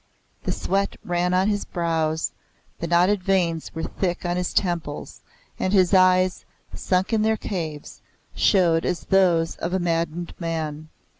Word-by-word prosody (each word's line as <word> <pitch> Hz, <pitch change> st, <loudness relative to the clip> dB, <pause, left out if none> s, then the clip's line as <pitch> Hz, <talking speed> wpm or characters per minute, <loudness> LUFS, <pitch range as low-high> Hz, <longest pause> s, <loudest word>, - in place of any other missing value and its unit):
The -, -, 0 dB
sweat 195 Hz, +1 st, -1 dB
ran 175 Hz, 0 st, 0 dB
on 185 Hz, +2 st, +2 dB
his 205 Hz, -1 st, 0 dB
brows, 160 Hz, -2 st, -1 dB, 0.5 s
the 170 Hz, -, -3 dB
knotted 180 Hz, +4 st, +3 dB
veins 175 Hz, -4 st, 0 dB
were 160 Hz, -, -3 dB
thick 180 Hz, -2 st, -2 dB
on 175 Hz, 0 st, 0 dB
his 180 Hz, 0 st, -1 dB
temples, 170 Hz, -6 st, -2 dB, 0.4 s
and 185 Hz, -, 0 dB
his 185 Hz, -1 st, +4 dB
eyes, 185 Hz, -1 st, +4 dB, 0.3 s
sunk 185 Hz, +4 st, 0 dB
in 220 Hz, -, +3 dB
their 220 Hz, 0 st, +2 dB
caves, 160 Hz, -9 st, -5 dB, 0.3 s
showed 170 Hz, -5 st, +3 dB
as 180 Hz, -, -1 dB
those 175 Hz, -4 st, +2 dB
of 170 Hz, +2 st, -3 dB
a 190 Hz, -, +1 dB
maddened 170 Hz, 0 st, -2 dB
man. 155 Hz, -2 st, -4 dB
175 Hz, 150 wpm, -23 LUFS, 165-190 Hz, 0.5 s, his